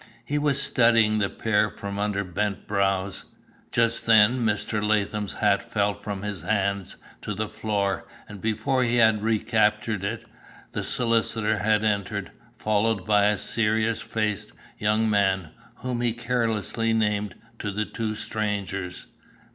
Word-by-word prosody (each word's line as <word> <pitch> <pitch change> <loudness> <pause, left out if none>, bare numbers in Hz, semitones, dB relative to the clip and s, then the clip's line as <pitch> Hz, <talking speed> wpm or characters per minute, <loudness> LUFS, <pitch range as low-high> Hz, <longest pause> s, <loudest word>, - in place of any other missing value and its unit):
He 145 +1 0
was 145 -2 +2
studying 115 -5 +4
the 100 -2 +1
pair 105 -1 +1
from 100 0 -6
under 105 -1 0
bent 100 +2 -2
brows. 100 -1 0 0.5
Just 115 0 +1
then 110 +3 +6
Mr. 110 -1 0
Latham's 105 -1 0
hat 100 -2 +2
fell 105 0 0
from 100 -1 -6
his 105 -4 -4
hands 100 0 -1 0.2
to 105 - -4
the 110 +2 -2
floor, 105 -2 -2 0.2
and 105 -3 -10
before 115 +4 +1
he 120 0 +1
had 110 -3 +4
recaptured 110 -2 +1
it, 105 +3 -3 0.5
the - - -3
solicitor 115 -2 0
had 110 +1 +2
entered, 100 -3 -1 0.3
followed 110 -2 +1
by 105 -1 +4
a 105 0 +2
serious 110 +1 0
faced 105 -2 -2 0.3
young 105 +1 +2
man, 95 -5 +2 0.3
whom 125 -1 -3
he 120 -2 +1
carelessly 115 -2 -1
named 105 -3 0 0.2
to 105 - -3
the 105 +2 -1
two 110 -1 -3
strangers. 100 -4 -3
105 Hz, 140 wpm, -25 LUFS, 100-110 Hz, 0.5 s, then